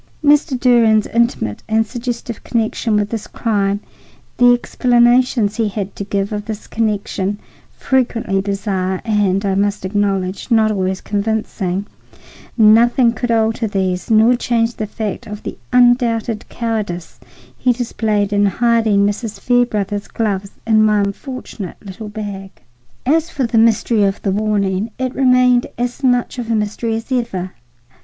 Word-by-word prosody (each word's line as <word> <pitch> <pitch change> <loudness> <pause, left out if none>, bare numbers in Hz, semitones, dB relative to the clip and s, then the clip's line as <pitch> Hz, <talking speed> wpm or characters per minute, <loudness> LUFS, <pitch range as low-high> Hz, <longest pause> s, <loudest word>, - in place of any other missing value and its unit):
Mr. 290 -2 +3
Durand's 230 -4 +4
intimate 235 - 0
and 220 0 +2
suggestive 235 -1 -5
connection 225 -1 -1
with 205 0 0
this 225 -3 -4
crime, 205 -3 -1 0.6
the 245 0 +6
explanations 240 -2 +2
he 225 -2 +1
had 200 -1 -5
to - - -4
give 200 0 -2
of 210 0 -4
this 215 -1 -6
connection, 205 -2 -2 0.4
frequently 235 -7 0
bizarre 195 -2 -2
and, 205 -3 +1
I 195 - +1
must 200 0 0
acknowledge, 195 -1 -1
not 220 -2 +3
always 190 -2 -1
convincing,—nothing 220 +3 0
could 245 +1 -3
alter 225 0 +1
these 190 -3 -2
nor 225 +2 +5
change 235 -1 0
the 215 - -3
fact 215 -1 -5
of 210 0 -8
the - - -5 0.2
undoubted 240 -3 +2
cowardice 210 -7 -4 0.4
he 250 - +1
displayed 215 -4 -1
in 205 0 +3
hiding 220 -1 +2
Mrs. 205 0 -3
Fairbrother's 210 -4 0
gloves 200 -3 -2 0.2
in 220 -1 +4
my 210 -1 +3
unfortunate 200 -1 -5
little 210 +2 -9
bag. 205 -2 -6 0.6
As 320 +5 +2
for 270 - -1
the 230 -1 +1
mystery 225 0 +3
of 195 0 -1
the 195 - 0
warning, 205 0 0
it 255 0 -2
remained 250 -2 +3
as 245 +3 -3
much 245 -1 +1
of 235 -2 -5
a 230 - +2
mystery 215 +2 -1
as 225 +4 -6
ever. 195 -8 -2
220 Hz, 140 wpm, -17 LUFS, 200-235 Hz, 0.6 s, the